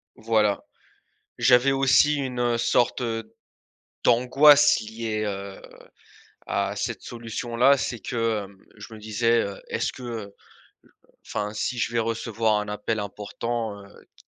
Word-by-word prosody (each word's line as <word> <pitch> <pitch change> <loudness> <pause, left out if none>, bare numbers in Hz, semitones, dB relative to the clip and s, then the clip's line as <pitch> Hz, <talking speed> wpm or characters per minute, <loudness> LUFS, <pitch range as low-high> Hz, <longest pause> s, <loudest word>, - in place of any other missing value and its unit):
Voilà. 110 -3 +1 0.8
J'avais 125 +3 +5
aussi 135 +2 +4
une 125 -4 -1
sorte 120 +2 +1 1.0
d'angoisse 140 +5 +6
liée, 110 0 -4
heu, 100 -1 -6 0.9
à - - -1
cette - - -3
solution-là, 120 +3 +1
c'est 120 -3 -3
que, 115 -4 -2
hem, 100 0 -15 0.2
je 115 - -11
me 110 - -10
disais, 115 +2 +1
heu, 100 -1 -6
est-ce - - -2
que, 130 - -12
heu, 110 -5 -6 0.9
enfin 105 0 -3
si 115 +4 -2
je 115 - -1
vais 120 - 0
recevoir 115 -1 0
un 105 - -6
appel 105 +1 -2
important, 105 +1 -5
heu, - - -15 0.3
qu - - -21
115 Hz, 130 wpm, -25 LUFS, 105-125 Hz, 1.0 s, d'angoisse